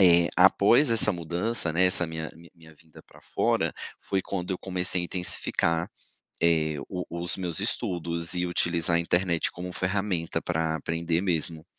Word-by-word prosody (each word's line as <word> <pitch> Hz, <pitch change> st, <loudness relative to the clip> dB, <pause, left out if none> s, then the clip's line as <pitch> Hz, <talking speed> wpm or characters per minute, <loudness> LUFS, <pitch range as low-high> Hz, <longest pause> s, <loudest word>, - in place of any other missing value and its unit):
eh, 85 Hz, -2 st, +6 dB
após 100 Hz, +8 st, +5 dB
essa 110 Hz, -2 st, +4 dB
mudança, 85 Hz, +3 st, -2 dB
né, 90 Hz, +3 st, +3 dB
essa 90 Hz, -1 st, +2 dB
minha 80 Hz, -1 st, -5 dB
mi 85 Hz, +1 st, -16 dB
minha 80 Hz, -2 st, -17 dB
vinda 80 Hz, +1 st, -18 dB
pra -, -, -20 dB
fora, -, -, 0 dB, 0.3 s
foi 95 Hz, -1 st, -1 dB
quando 95 Hz, 0 st, -4 dB
eu 90 Hz, -, -4 dB
comecei 90 Hz, -1 st, 0 dB
a -, -, -3 dB
intensificar, 85 Hz, -2 st, 0 dB, 0.5 s
eh, 80 Hz, -2 st, +2 dB
o 90 Hz, -1 st, -4 dB
os 85 Hz, +2 st, -1 dB
meus 90 Hz, -4 st, -3 dB
estudos 85 Hz, -1 st, -1 dB
e 90 Hz, 0 st, -1 dB
utilizar 85 Hz, -1 st, +1 dB
a -, -, +2 dB
internet 85 Hz, 0 st, 0 dB
como 90 Hz, +1 st, -7 dB
ferramenta 95 Hz, -2 st, -2 dB
pra 80 Hz, 0 st, -1 dB
aprender 85 Hz, +2 st, -1 dB
mesmo. 80 Hz, -3 st, -2 dB
85 Hz, 165 wpm, -27 LUFS, 85-90 Hz, 0.5 s, eh